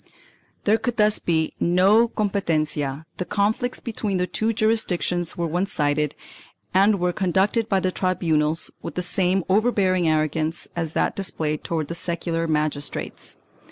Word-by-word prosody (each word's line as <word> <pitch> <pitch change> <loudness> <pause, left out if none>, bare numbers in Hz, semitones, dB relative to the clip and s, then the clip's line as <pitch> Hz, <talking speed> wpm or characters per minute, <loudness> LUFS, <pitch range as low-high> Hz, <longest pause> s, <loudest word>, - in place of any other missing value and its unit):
1 - - -31 0.5
There 215 +2 +3
could 245 -2 -3
thus 210 -1 +4
be 160 -2 0
no 195 +7 +4
competencia; 160 - -1
the - - -2
conflicts 215 +6 -1
between 215 -4 -3
the 180 - +1
two 220 +4 -1
jurisdictions 200 -6 0
were 170 - -1
one 175 +4 -1
sided 150 -3 0 0.6
and 200 +2 +4
were 180 0 0
conducted 195 +5 +1
by 195 -3 +3
the 185 - 0
tribunals 165 -4 0
with - - -7
the 180 - 0
same 185 +1 +1
overbearing 190 -4 +2
arrogance 155 +1 0
as 165 -2 -3
that - - 0
displayed 155 -6 -1
towards 165 -1 -2
secular 165 -1 -2
magistrates. 150 -2 -3
180 Hz, 145 wpm, -23 LUFS, 160-200 Hz, 0.6 s, thus